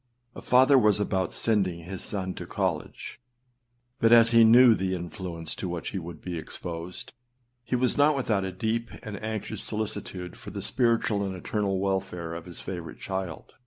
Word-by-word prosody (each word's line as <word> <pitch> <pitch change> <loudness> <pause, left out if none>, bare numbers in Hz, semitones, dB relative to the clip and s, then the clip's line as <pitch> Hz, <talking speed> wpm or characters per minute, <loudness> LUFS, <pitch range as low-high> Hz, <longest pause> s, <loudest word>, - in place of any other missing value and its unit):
âA - - -8
father 130 +2 +5
was 105 -3 +3
about 95 -2 0
sending 95 -6 0
his 95 +2 -6
son 95 -2 -2
to - - -8
college; - - -3 0.8
but 115 - +4
as 115 -1 +7
he 115 -1 +7
knew 120 +2 +8
the 95 -3 -1
influence 85 -1 -6
to 95 - -4
which 85 -1 -4
he 95 - -3
would 85 -2 -8
be 90 -2 -4
exposed, 85 +2 -7 0.5
he 125 - -1
was 125 +2 +1
not 150 +1 +5
without 110 -7 0
a 95 - -3
deep 110 +5 -2
and 105 -1 -7
anxious 110 -1 -4
solicitude 100 -4 -4
for - - -10
the - - -6
spiritual 115 -4 +1
and 95 -1 -3
eternal 95 +1 -1
welfare 95 -4 -2
of 85 0 -7
his 90 -2 -9
favourite 85 -3 -6
child. 95 -2 -5
95 Hz, 175 wpm, -27 LUFS, 90-115 Hz, 0.8 s, knew